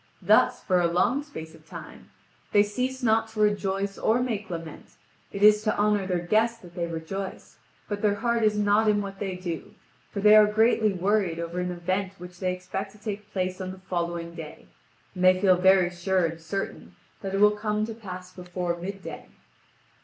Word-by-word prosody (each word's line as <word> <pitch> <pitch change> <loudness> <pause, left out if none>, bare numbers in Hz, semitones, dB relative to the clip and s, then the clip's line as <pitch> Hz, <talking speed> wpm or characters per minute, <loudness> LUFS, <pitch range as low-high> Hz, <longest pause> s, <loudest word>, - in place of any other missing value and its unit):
Thus, - - +4
for 185 -2 +2
a 170 - +3
long 180 +11 +2
space 160 - -9
of - - -18
time, - - -11 0.4
they 205 - +6
cease 255 +5 -3
not 225 -1 +3
to 220 -1 -9
rejoice 200 -1 0
or 225 +3 +2
make 220 -5 -2
lament: 165 -3 -8 0.4
it 200 - -3
is 210 0 +7
to 215 0 0
honour 205 -2 +2
their 180 -2 0
guest 230 +4 +1
that 175 -1 -13
they 170 -1 -2
rejoice, 170 +4 -6 0.3
but 205 -1 -4
their 205 -1 +2
heart 235 +2 0
is 215 -1 +2
not 210 +1 +3
in 210 -1 +3
what 195 -1 -8
they 195 -2 -3
do, 175 -3 -6 0.3
for 200 - -5
they 210 +1 +7
are 215 -1 +8
greatly 220 0 +3
worried 190 -2 +1
over 170 +1 -4
an 180 0 -1
event 185 +2 -2
which 180 0 -11
they 185 -1 0
expect 185 +2 -5
to - - -16
take 210 -1 -6
place 185 0 -2
on 185 - -4
the 190 - -7
following 170 -2 -3
day, 155 - -9 0.5
and 185 -1 -4
they 185 0 +6
feel 185 -1 +5
very 185 0 +4
sure 180 +1 +1
and 165 0 -4
certain 195 +5 -5 0.3
that 195 -1 -3
it - - 0
will 210 0 +7
come 210 0 -1
to 225 - -6
pass 185 -4 -9
before 180 -1 -3
midday. 190 +3 -7
195 Hz, 200 wpm, -26 LUFS, 180-210 Hz, 0.5 s, are